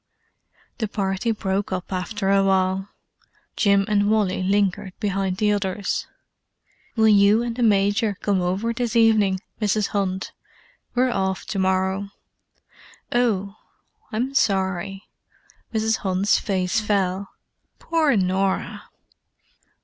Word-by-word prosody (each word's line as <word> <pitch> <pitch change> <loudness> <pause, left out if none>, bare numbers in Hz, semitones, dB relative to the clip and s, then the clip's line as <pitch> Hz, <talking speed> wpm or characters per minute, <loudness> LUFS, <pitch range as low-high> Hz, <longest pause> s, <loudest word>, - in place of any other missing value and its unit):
The 220 - -1
party 195 +1 -2
broke 200 -2 -1
up 185 +1 -4
after 195 +2 -2
a 195 0 +4
while. 190 0 +1 0.7
Jim 200 -1 +3
and 205 -1 +2
Wally 210 -4 +1
lingered 195 0 0
behind 195 -3 -1
the 210 0 +2
others. 200 -1 -2 0.9
"Will 220 -1 +4
you 205 +2 +5
and 235 -1 -3
the 250 - -4
Major 205 -1 +2
come 200 -3 0
over 190 +6 -1
this 235 -1 -2
evening, 215 -5 +3 0.2
Mrs. 210 0 +1
Hunt? 190 -2 -2 0.6
We're 250 +1 +2
off 190 -3 -1
to 200 - -3
morrow." 190 +1 0 1.0
"Oh—I'm 240 - -3
sorry." 195 -3 0 0.6
Mrs. 220 0 +1
Hunt's 190 +1 +1
face 185 +1 0
fell. 200 -2 -1 0.5
"Poor 320 -5 +1
Norah!" 190 +1 -1
200 Hz, 110 wpm, -23 LUFS, 190-220 Hz, 1.0 s, you